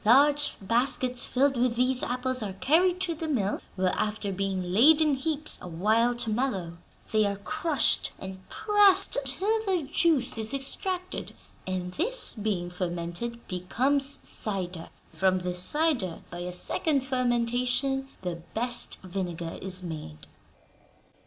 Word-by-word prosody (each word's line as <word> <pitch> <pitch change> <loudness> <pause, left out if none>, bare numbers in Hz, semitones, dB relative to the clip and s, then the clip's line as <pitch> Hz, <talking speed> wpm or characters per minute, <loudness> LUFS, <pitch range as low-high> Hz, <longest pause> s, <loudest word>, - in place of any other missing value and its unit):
Large 285 +6 +4
baskets 245 +4 +1
filled 270 +1 +1
with 240 -1 +1
these 250 +1 +2
apples 255 0 -2
are 200 -3 -4
carried 345 - +2
to 345 -3 0
the 320 0 -5
mill, 215 -9 -1
where, 185 -1 0
after 210 -1 -2
being 190 -2 -3
laid 295 +10 +6
in 305 -2 +3
heaps 305 +2 0
a - - -8
while 220 +8 +1
to 230 -2 -4
mellow, 195 -9 -2 0.3
they 215 0 +3
are 200 - -2
crushed 290 - 0
and 190 0 -8
pressed 405 -2 +4
till 400 +12 -1
their 365 -4 +1
juice 285 -5 +2
is 220 +4 +2
extracted; 365 +7 -2 0.3
and 180 -1 -4
this, - - +6
being 200 -5 -3
fermented, 180 +6 -5
becomes 265 +10 0
cider. 185 -5 -3 0.2
From 190 -1 +2
this 180 0 -2
cider, 280 - 0
by 175 - -7
a 180 +1 -5
second 275 - 0
fermentation, 250 +1 0 0.2
the 175 -2 -3 0.2
best 240 +1 0
vinegar 175 -3 -5
is 185 -1 -2
made." 150 - -8
240 Hz, 140 wpm, -27 LUFS, 185-280 Hz, 0.3 s, laid